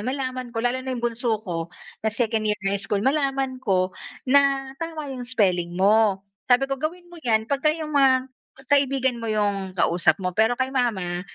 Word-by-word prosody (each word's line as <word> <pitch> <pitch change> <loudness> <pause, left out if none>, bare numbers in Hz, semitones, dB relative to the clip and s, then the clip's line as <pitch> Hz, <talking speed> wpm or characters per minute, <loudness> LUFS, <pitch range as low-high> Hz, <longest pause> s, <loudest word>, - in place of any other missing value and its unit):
malaman 255 +1 -3
ko." 230 0 -4
Lalo 250 +2 +1
na 260 0 -4
'yong 240 - -5
bunso 235 -1 0
ko 170 -3 -3 0.3
na 220 - 0
second 220 -1 -1
year 210 - +1
high 195 0 0
school. 205 -1 -2
"Malaman 270 -2 0
ko 185 -6 +1 0.3
na 275 0 +3
tama 315 -4 -5
'yong 245 -2 -7
spelling 180 -7 +1
mo." 200 0 +3 0.2
Sabi 250 +1 +5
ko, 270 -1 -4
"Gawin 345 +3 -3
mo 340 - -11
'yan 220 -6 +1
pagka 280 +5 0
'yong 310 0 -2
mga 265 -2 +3 0.4
kaibigan 265 -3 +2
mo 230 - -4
'yong 200 -3 -1
kausap 170 -2 +3
mo, 180 - 0
pero 220 +5 +2
kay 260 +1 -1
mama, 190 -9 -1
245 Hz, 185 wpm, -24 LUFS, 205-270 Hz, 0.4 s, Sabi